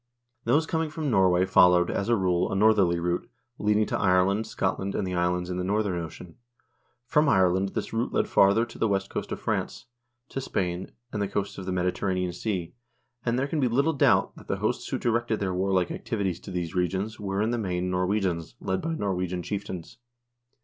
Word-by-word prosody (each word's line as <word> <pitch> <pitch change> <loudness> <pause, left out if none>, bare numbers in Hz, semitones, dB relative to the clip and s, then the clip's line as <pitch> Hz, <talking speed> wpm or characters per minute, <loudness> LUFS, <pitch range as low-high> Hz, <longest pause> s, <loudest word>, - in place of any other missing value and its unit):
Those 155 +2 +3
coming 160 -1 -1
from 150 -2 -3
Norway 95 -3 +4
followed, 90 -2 +5
as 100 - -2
a 120 - +5
rule, 90 -3 +1
a - - -1
northerly 100 -4 +4
route, 85 +1 -2 0.3
leading 105 +1 +2
to - - -2
Ireland, 100 +3 +2
Scotland, 100 -2 -2
and - - -1
the 90 - -3
islands 90 0 0
in 90 - -3
the 90 - -1
northern 100 -2 0
ocean. 80 +1 -10 0.7
From 150 +3 +3
Ireland 95 -2 +2
this - - -3
route 115 +2 -1
led - - +1
farther 100 +4 +4
to 115 - -13
the 115 - +2
west 95 -1 -1
coast - - -4
of - - -3
France, - - -2 0.4
to 135 - -4
Spain, 90 -6 -2 0.2
and 105 - -2
the 100 - 0
coasts 100 0 -3
of 95 - -7
the - - -1
Mediterranean 90 0 -1
Sea, 90 -2 -3 0.5
and 120 0 0
there 135 +2 0
can 155 +2 -2
be 130 - +3
little 140 +7 +2
doubt 140 - +3
that - - -13
the - - -1
hosts - - -1
who - - -1
directed 120 -1 0
their 95 -2 -1
warlike 95 -1 +1
activities 100 -7 -2
to - - -11
these 90 -2 -3
regions 95 +4 -1
were, 100 0 -1
in 110 - 0
the 120 - -1
main, 90 -3 -2
Norwegians, 90 - -1
led 95 0 -2
by 165 0 -2
Norwegian 90 - -2
chieftains. 100 +2 -6
95 Hz, 200 wpm, -27 LUFS, 90-110 Hz, 0.7 s, followed